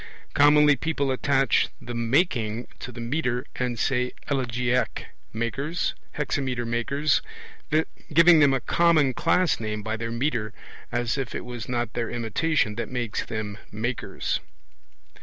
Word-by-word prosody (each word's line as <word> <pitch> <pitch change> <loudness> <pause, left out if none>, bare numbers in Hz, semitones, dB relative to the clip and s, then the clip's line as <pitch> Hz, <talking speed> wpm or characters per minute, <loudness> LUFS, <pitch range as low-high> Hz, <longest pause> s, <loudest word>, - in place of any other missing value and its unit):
Commonly 150 0 +6
people 140 -1 -1
attach 135 +1 +2
the 120 - -7
'making' 120 - +1
to 125 - -6
the 120 - -10
metre 125 0 -1
and 125 -2 -1
say 125 0 0 0.2
'elegiac 125 -2 0 0.3
makers', 135 +9 -2 0.2
'hexameter 130 -5 -1
makers,' 140 +6 +1 0.9
giving 165 +1 +7
them 145 -2 +6
a 135 - +2
common 155 -1 +3
class 180 +3 +2
name 105 -1 -3
by 110 +1 -2
their 115 +1 -4
metre, 115 -3 -1 0.4
as 120 +2 0
if 130 -4 -4
it - - -4
was 120 -3 -6
not 120 -2 -1
their 115 -1 -2
imitation 120 +1 0
that 115 - -3
makes 120 -3 -2
them 110 -2 -5
'makers'). 115 +4 -2
125 Hz, 135 wpm, -25 LUFS, 115-145 Hz, 0.9 s, giving